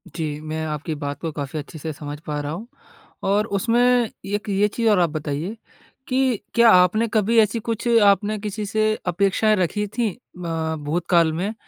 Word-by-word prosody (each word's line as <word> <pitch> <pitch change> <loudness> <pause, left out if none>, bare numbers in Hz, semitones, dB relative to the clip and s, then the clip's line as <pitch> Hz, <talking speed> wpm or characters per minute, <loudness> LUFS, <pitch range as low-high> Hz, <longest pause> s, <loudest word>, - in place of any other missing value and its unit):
जी, 150 -3 -3
मैं 155 +1 -4
आपकी 155 +1 -3
बात 145 -1 -5
को 165 -2 -3
काफ़ी 145 +1 -5
अच्छे 155 +2 -9
से 160 +2 -4
समझ 145 0 -7
पा 150 -1 -2
रहा 145 +1 -4
हूँ। 205 +8 -6 0.6
और 205 +2 +2
उसमें 240 +2 +3 0.2
एक 205 +1 -2
ये 200 +1 +3
चीज़ 225 +2 0
और 205 - +4
आप 170 -2 +3
बताइए 155 +7 -4 0.5
कि 255 -3 +1 0.2
क्या 235 -1 +7
आपने 185 +6 +4
कभी 220 +2 +2
ऐसी 220 +2 +2
कुछ 230 +1 -3 0.2
आपने 205 +1 +3
किसी 210 0 -4
से 215 +1 0 0.2
अपेक्षाएँ 200 +4 +2
रखी 205 +2 0
थी 235 -3 +2
अ, 165 -8 -5
भूतकाल 165 +2 +2
में 195 +7 -2
190 Hz, 180 wpm, -22 LUFS, 160-220 Hz, 0.6 s, क्या